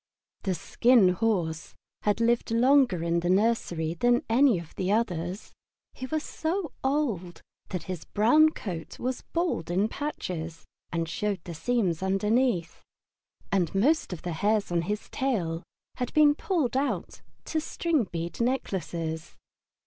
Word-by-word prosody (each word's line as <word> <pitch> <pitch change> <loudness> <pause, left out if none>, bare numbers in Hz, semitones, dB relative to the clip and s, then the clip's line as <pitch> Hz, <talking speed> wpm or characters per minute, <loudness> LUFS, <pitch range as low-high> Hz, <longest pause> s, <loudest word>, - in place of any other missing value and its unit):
The 190 -3 -1
Skin 230 +4 +4
Horse 180 -5 -1 0.3
had 210 +1 +1
lived 235 0 +2
longer 240 - +4
in 170 0 +1
the 175 +1 -1
nursery 185 -5 +1
than 240 +7 +2
any 240 -1 +4
of 170 -2 -9
the 185 +1 -1
others. 185 -4 -1 0.4
He 260 - -6
was 310 +2 -1
so 330 -1 -2
old 240 - -1 0.3
that 180 -3 -3
his 180 -1 -6
brown 300 +10 +5
coat 175 - -6
was 255 0 -3
bald 335 - -2
in 190 +4 +2
patches 175 - -5 0.3
and 165 -1 -1
showed 195 +1 -2
the 170 - -7
seams 180 0 0
underneath, 195 0 +1 0.7
and 185 -3 +1
most 285 +9 +2
of 175 - -6
the 175 - -3
hairs 205 +3 +1
in 170 -1 +2
his 210 0 -2
tail 180 -12 -1 0.4
had 250 -2 -2
been 300 -1 +7
pulled 305 -6 -1
out 275 +2 -1 0.2
to 315 - -1
string 315 -5 0
bead 170 +2 -5
necklaces. 170 -10 -2
205 Hz, 140 wpm, -27 LUFS, 170-255 Hz, 0.7 s, been